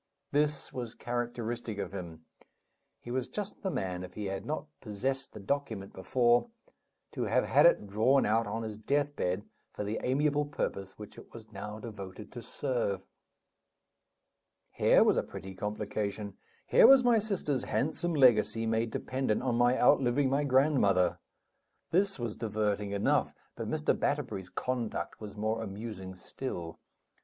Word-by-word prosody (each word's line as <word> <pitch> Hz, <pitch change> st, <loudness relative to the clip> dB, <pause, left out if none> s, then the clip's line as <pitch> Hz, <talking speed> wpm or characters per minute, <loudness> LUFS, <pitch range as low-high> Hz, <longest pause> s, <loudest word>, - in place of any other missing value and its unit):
This 150 Hz, 0 st, 0 dB
was 120 Hz, -2 st, -5 dB
characteristic 120 Hz, -2 st, -3 dB
of -, -, -4 dB
him; 85 Hz, -4 st, -7 dB, 0.8 s
he 120 Hz, -, -8 dB
was 130 Hz, +1 st, -1 dB
just 205 Hz, +10 st, -5 dB
the 195 Hz, -, -1 dB
man, 95 Hz, -, -3 dB
if 90 Hz, 0 st, -10 dB
he 105 Hz, -, -4 dB
had 95 Hz, +2 st, -4 dB
not 155 Hz, 0 st, -2 dB
possessed 130 Hz, +5 st, -3 dB
the -, -, -9 dB
document 110 Hz, -3 st, -3 dB
before, 120 Hz, -, +2 dB, 0.6 s
to -, -, -2 dB
have -, -, +2 dB
had -, -, +6 dB
it 170 Hz, -, +3 dB
drawn 110 Hz, +7 st, +3 dB
out 110 Hz, +1 st, +2 dB
on 115 Hz, +2 st, -3 dB
his 110 Hz, -1 st, -6 dB
death 145 Hz, +5 st, 0 dB
bed 90 Hz, +3 st, -1 dB, 0.3 s
for -, -, -4 dB
the 105 Hz, +2 st, -2 dB
amiable 145 Hz, +3 st, +2 dB
purpose 100 Hz, -9 st, -4 dB
which 105 Hz, -1 st, -10 dB
it -, -, -15 dB
was 110 Hz, -1 st, -12 dB
now 105 Hz, +1 st, -6 dB
devoted 105 Hz, -3 st, -8 dB
to 120 Hz, -, -7 dB
serve. 120 Hz, -5 st, -2 dB, 1.7 s
Here -, -, +5 dB
was -, -, +3 dB
a -, -, +4 dB
pretty 95 Hz, 0 st, -8 dB
complication! 105 Hz, 0 st, -3 dB, 0.3 s
Here -, -, +7 dB
was 270 Hz, -1 st, +8 dB
my 240 Hz, -2 st, +5 dB
sister's 185 Hz, -, -1 dB
handsome 165 Hz, +4 st, -1 dB
legacy 115 Hz, -5 st, +4 dB
made 115 Hz, +1 st, +1 dB
dependent 130 Hz, -1 st, -1 dB
on 130 Hz, -2 st, +1 dB
my 120 Hz, +2 st, +3 dB
outliving 135 Hz, +1 st, +4 dB
my 145 Hz, +2 st, +2 dB
grandmother! 130 Hz, -, +3 dB, 0.7 s
This 195 Hz, +3 st, +2 dB
was 120 Hz, -4 st, -4 dB
diverting 105 Hz, -2 st, -1 dB
enough; 100 Hz, 0 st, +1 dB, 0.2 s
but -, -, -4 dB
Mr. -, -, +1 dB
Batterbury's 95 Hz, -1 st, -1 dB
conduct 125 Hz, -4 st, -3 dB
was 105 Hz, -1 st, -8 dB
more 110 Hz, +2 st, -1 dB
amusing 100 Hz, -3 st, -6 dB
still. 90 Hz, -4 st, -6 dB
115 Hz, 150 wpm, -31 LUFS, 105-135 Hz, 1.7 s, was